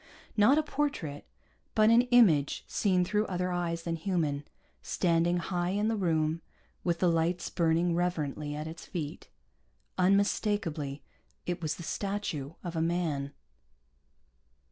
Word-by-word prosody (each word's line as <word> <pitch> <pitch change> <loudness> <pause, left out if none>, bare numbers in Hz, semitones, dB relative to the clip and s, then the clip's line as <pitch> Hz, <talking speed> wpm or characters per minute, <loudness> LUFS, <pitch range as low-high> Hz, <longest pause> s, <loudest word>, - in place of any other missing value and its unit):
Not 230 +7 +5
a 310 - +3
portrait, 275 - -2 0.5
but 215 0 +5
an 235 +1 +7
image 180 - +4
seen 185 -3 +2
through 210 +4 0
other 180 0 -1
eyes 170 -1 -2
than 165 -1 -2
human, 155 -5 -1 0.4
standing 170 0 +1
high 175 0 -1
in 205 +3 +1
the 225 - +1
room 160 -4 0 0.4
with 170 -1 +1
the 180 - +2
lights 170 +1 +1
burning 170 0 +2
reverently 155 -4 -1
at 150 +1 -4
its 160 +1 -8
feet. 150 -4 -6 0.7
Unmistakably 185 -6 +1 0.4
it 175 0 -3
was 155 -2 -1
the 170 - -9
statue 190 -7 -3
of 175 -2 -5
a 160 - 0
man. 160 -5 -1
175 Hz, 135 wpm, -30 LUFS, 160-195 Hz, 0.7 s, an